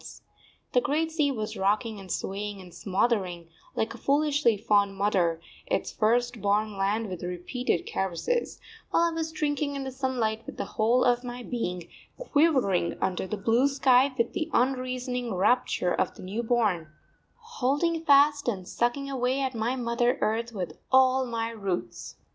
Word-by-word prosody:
The 250 Hz, -, +4 dB
great 320 Hz, +4 st, 0 dB
sea 305 Hz, -3 st, +1 dB
was 215 Hz, -5 st, -4 dB
rocking 210 Hz, +3 st, 0 dB
and 190 Hz, -2 st, -9 dB
swaying 200 Hz, +1 st, -3 dB
and 180 Hz, -2 st, -12 dB
smothering, 185 Hz, -2 st, -1 dB, 0.3 s
like 220 Hz, -, -1 dB
a -, -, -11 dB
foolishly 285 Hz, -5 st, +2 dB
fond 200 Hz, -2 st, +2 dB
mother, 185 Hz, -5 st, +1 dB, 0.3 s
its -, -, -1 dB
first 240 Hz, +1 st, +1 dB
born 205 Hz, +1 st, +1 dB
land 205 Hz, +3 st, 0 dB
with 180 Hz, -3 st, -6 dB
repeated 180 Hz, +4 st, -2 dB
caresses; 195 Hz, -, -2 dB, 0.3 s
while 335 Hz, -, +3 dB
I 340 Hz, -, +2 dB
was 325 Hz, -1 st, -3 dB
drinking 290 Hz, -2 st, -1 dB
in 275 Hz, -, -3 dB
the 265 Hz, -, -5 dB
sunlight 250 Hz, -4 st, -1 dB
with -, -, -8 dB
the -, -, -2 dB
whole 235 Hz, +3 st, +2 dB
of 245 Hz, 0 st, +2 dB
my 245 Hz, 0 st, -6 dB
being, 180 Hz, -8 st, -4 dB, 0.3 s
quivering 285 Hz, -, +2 dB
under 190 Hz, 0 st, -1 dB
the 215 Hz, -, -3 dB
blue 230 Hz, +6 st, +3 dB
sky 270 Hz, -1 st, +4 dB
with 235 Hz, -1 st, 0 dB
the 315 Hz, -1 st, -2 dB
unreasoning 250 Hz, -2 st, -1 dB
rapture 190 Hz, -2 st, +2 dB
of 185 Hz, -, -1 dB
the -, -, -11 dB
new 200 Hz, +5 st, -3 dB
born, 220 Hz, -9 st, +1 dB, 0.5 s
holding 335 Hz, -, -1 dB
fast 285 Hz, -1 st, +5 dB
and 190 Hz, -6 st, -2 dB
sucking 240 Hz, +4 st, -1 dB
away 260 Hz, 0 st, 0 dB
at 265 Hz, -1 st, -1 dB
my 230 Hz, +2 st, -1 dB
mother 240 Hz, 0 st, +1 dB
earth 230 Hz, +2 st, 0 dB
with 185 Hz, -6 st, -5 dB
all 260 Hz, 0 st, +4 dB
my 230 Hz, -1 st, -2 dB
roots. 190 Hz, -, -4 dB
240 Hz, 160 wpm, -27 LUFS, 200-265 Hz, 0.5 s, fast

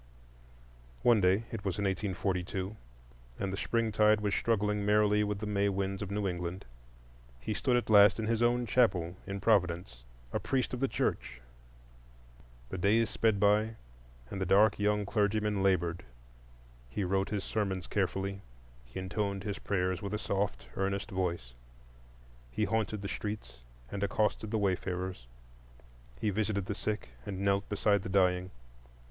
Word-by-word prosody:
One 115 Hz, -4 st, +5 dB
day—it 100 Hz, +4 st, +1 dB
was 95 Hz, -1 st, -2 dB
in 100 Hz, -, -1 dB
1842, 95 Hz, 0 st, -2 dB, 0.6 s
and 95 Hz, -1 st, -2 dB
the -, -, 0 dB
springtide 110 Hz, 0 st, +2 dB
was 105 Hz, -1 st, -1 dB
struggling 105 Hz, -2 st, +1 dB
merrily 105 Hz, 0 st, +3 dB
with 105 Hz, -1 st, -1 dB
the 105 Hz, -, -5 dB
May 100 Hz, -1 st, +1 dB
winds 95 Hz, 0 st, -2 dB
of 100 Hz, -, -4 dB
New 100 Hz, 0 st, -1 dB
England—he -, -, -7 dB
stood 125 Hz, +1 st, +2 dB
at 120 Hz, -, -1 dB
last 100 Hz, -2 st, +7 dB
in 110 Hz, -, -2 dB
his 115 Hz, +1 st, 0 dB
own 120 Hz, +1 st, +3 dB
chapel 95 Hz, -9 st, +2 dB
in 100 Hz, 0 st, -4 dB
Providence, 90 Hz, -, +1 dB, 0.3 s
a -, -, +1 dB
priest 130 Hz, -1 st, -1 dB
of 125 Hz, -, -2 dB
the 135 Hz, -, +2 dB
Church. -, -, -2 dB, 1.3 s
The 95 Hz, -, -4 dB
days 110 Hz, +5 st, +3 dB
sped 110 Hz, -3 st, +2 dB
by, 105 Hz, +2 st, +3 dB, 0.6 s
and 95 Hz, -, -4 dB
the -, -, +1 dB
dark 105 Hz, +3 st, +5 dB
young 105 Hz, 0 st, +1 dB
clergyman 105 Hz, 0 st, +1 dB
labored; 90 Hz, -3 st, +1 dB, 0.9 s
he 95 Hz, -, -2 dB
wrote 95 Hz, +1 st, 0 dB
his 105 Hz, -2 st, -2 dB
sermons 95 Hz, -4 st, -2 dB
carefully; 95 Hz, 0 st, -1 dB, 0.4 s
he -, -, -11 dB
intoned 100 Hz, +1 st, -2 dB
his 100 Hz, 0 st, -4 dB
prayers 95 Hz, -1 st, -1 dB
with 100 Hz, +1 st, -3 dB
a -, -, 0 dB
soft, 100 Hz, -1 st, -2 dB
earnest 100 Hz, +1 st, -2 dB
voice; 85 Hz, -10 st, -2 dB, 1.0 s
he 110 Hz, -, -1 dB
haunted 110 Hz, -2 st, -1 dB
the -, -, -2 dB
streets 100 Hz, -, -5 dB, 0.3 s
and 100 Hz, -, -4 dB
accosted 105 Hz, +1 st, 0 dB
the 110 Hz, -, 0 dB
wayfarers; 95 Hz, -, -2 dB, 0.9 s
he 105 Hz, -, 0 dB
visited 100 Hz, -1 st, -1 dB
the 105 Hz, -, -2 dB
sick, 105 Hz, +1 st, -3 dB
and 95 Hz, -2 st, -5 dB
knelt 100 Hz, 0 st, +1 dB
beside 105 Hz, -1 st, +2 dB
the -, -, -6 dB
dying. 90 Hz, -1 st, +2 dB
100 Hz, 150 wpm, -31 LUFS, 95-105 Hz, 1.3 s, last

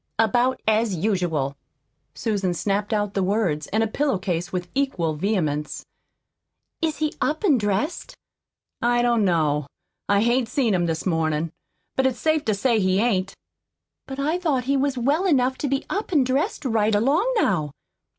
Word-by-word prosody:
"About 240 Hz, +4 st, +2 dB
as 220 Hz, -2 st, +2 dB
usual." 165 Hz, -7 st, -1 dB, 0.6 s
Susan 200 Hz, -6 st, -1 dB
snapped 200 Hz, +3 st, -1 dB
out 205 Hz, -2 st, 0 dB
the 195 Hz, -, 0 dB
words 185 Hz, -6 st, 0 dB
and 220 Hz, +2 st, +1 dB
a -, -, +1 dB
pillow 275 Hz, +1 st, 0 dB
case 180 Hz, -2 st, -3 dB
with 180 Hz, -1 st, -3 dB
equal 225 Hz, -, 0 dB
vehemence. 155 Hz, -4 st, -2 dB, 1.0 s
"Is 320 Hz, -2 st, 0 dB
he 305 Hz, -1 st, -1 dB
up 310 Hz, +5 st, 0 dB
an' 290 Hz, -10 st, +4 dB
dressed?" 205 Hz, -, -2 dB, 0.7 s
"I 240 Hz, 0 st, +2 dB
don't 235 Hz, -3 st, +3 dB
know. 150 Hz, -6 st, +1 dB, 0.4 s
I 200 Hz, 0 st, +4 dB
hain't 240 Hz, 0 st, +1 dB
seen 245 Hz, -7 st, +1 dB
him 175 Hz, -2 st, +1 dB
this 160 Hz, -1 st, -2 dB
mornin' 160 Hz, -2 st, 0 dB, 0.4 s
but 265 Hz, 0 st, +3 dB
it's 260 Hz, -, -2 dB
safe 315 Hz, -1 st, +1 dB
to 215 Hz, -, +1 dB
say 230 Hz, +2 st, +2 dB
he 185 Hz, -1 st, +2 dB
ain't." 195 Hz, -4 st, 0 dB, 0.7 s
"But 270 Hz, -, -6 dB
I 310 Hz, +5 st, 0 dB
thought 295 Hz, -8 st, 0 dB
he 275 Hz, +3 st, +1 dB
was 275 Hz, -1 st, 0 dB
well 290 Hz, +10 st, +1 dB
enough 260 Hz, -5 st, +2 dB
to 290 Hz, -, -1 dB
be 275 Hz, +1 st, -1 dB
up 405 Hz, +1 st, -3 dB
an' 295 Hz, -6 st, +4 dB
dressed 260 Hz, +3 st, -1 dB
right 220 Hz, -3 st, +2 dB
along 295 Hz, -, +2 dB
now." 165 Hz, -, +1 dB
220 Hz, 170 wpm, -23 LUFS, 185-265 Hz, 1.0 s, an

